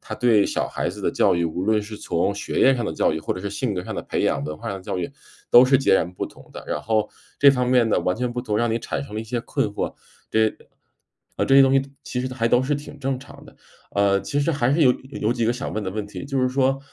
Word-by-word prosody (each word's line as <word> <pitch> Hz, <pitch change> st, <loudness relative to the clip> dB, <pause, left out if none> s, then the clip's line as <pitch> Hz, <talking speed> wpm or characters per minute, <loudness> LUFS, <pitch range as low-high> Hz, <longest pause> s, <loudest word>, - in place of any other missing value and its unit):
它 -, -, -7 dB
对 115 Hz, -5 st, +3 dB
小 -, -, -1 dB
孩 -, -, -2 dB
子 -, -, -7 dB
的 -, -, 0 dB
教 -, -, +3 dB
育， 85 Hz, 0 st, 0 dB
无 85 Hz, +2 st, -3 dB
论 110 Hz, +1 st, +2 dB
是 105 Hz, +1 st, -8 dB
从 90 Hz, 0 st, -1 dB
学 105 Hz, -, -3 dB
业 135 Hz, -, +6 dB
上 120 Hz, -, -2 dB
的 95 Hz, -, -2 dB
教 -, -, +1 dB
育， 80 Hz, -, -2 dB
或 -, -, -2 dB
者 90 Hz, -, -6 dB
是 100 Hz, -, -3 dB
性 105 Hz, 0 st, -2 dB
格 90 Hz, -, -3 dB
上 -, -, -5 dB
的 -, -, -4 dB
培 -, -, -2 dB
养、 70 Hz, -, +1 dB
文 75 Hz, +1 st, -5 dB
化 -, -, -6 dB
上 100 Hz, -, -4 dB
的 -, -, -13 dB
教 95 Hz, -, -3 dB
育 85 Hz, -, -3 dB, 0.4 s
都 120 Hz, -, +9 dB
是 130 Hz, +1 st, +4 dB
截 135 Hz, -, +3 dB
然 90 Hz, -2 st, +1 dB
不 -, -, -4 dB
同 -, -, -17 dB
的。 -, -, -9 dB
然 75 Hz, -, -2 dB
后 110 Hz, -1 st, +1 dB, 0.3 s
这 140 Hz, 0 st, +8 dB
方 125 Hz, -2 st, 0 dB
面 125 Hz, -2 st, +4 dB
的 -, -, +2 dB
完 90 Hz, -, 0 dB
全 125 Hz, +1 st, -2 dB
不 125 Hz, -, -3 dB
同， 105 Hz, -4 st, -1 dB
让 120 Hz, 0 st, +1 dB
你 115 Hz, -, 0 dB
产 115 Hz, -, -4 dB
生 120 Hz, -, -11 dB
了 110 Hz, -, -2 dB
一 110 Hz, -, -7 dB
些 120 Hz, +1 st, -3 dB
困 110 Hz, -, -1 dB
惑， 105 Hz, -, -4 dB, 0.4 s
对 110 Hz, -1 st, +2 dB, 0.8 s
啊 -, -, +1 dB
这 135 Hz, -, +3 dB
些 135 Hz, -, +9 dB
东 135 Hz, -, +4 dB
西 135 Hz, -, +5 dB, 0.2 s
其 125 Hz, -, -4 dB
实 130 Hz, 0 st, -4 dB
还 115 Hz, -3 st, 0 dB
都 125 Hz, -, +4 dB
是 145 Hz, +3 st, 0 dB
挺 145 Hz, 0 st, -8 dB
正 135 Hz, -2 st, -2 dB
常 140 Hz, -, -14 dB
的。 -, -, -16 dB, 0.4 s
呃， 100 Hz, -1 st, +2 dB
其 120 Hz, +9 st, -3 dB
实 145 Hz, -, +1 dB
还 130 Hz, -3 st, +1 dB
是 160 Hz, +3 st, +3 dB
有 130 Hz, -, +7 dB
有 130 Hz, +2 st, -10 dB
有 110 Hz, -, +2 dB
几 120 Hz, -2 st, -1 dB
个 115 Hz, -, +2 dB
想 125 Hz, -, -5 dB
问 110 Hz, -, -2 dB
的 95 Hz, -, -3 dB
问 105 Hz, +2 st, -4 dB
题。 105 Hz, -, -8 dB
就 140 Hz, -1 st, -1 dB
是 130 Hz, -, +2 dB
说， 135 Hz, +1 st, +1 dB
115 Hz, 325 characters per minute, -23 LUFS, 100-130 Hz, 0.8 s, 都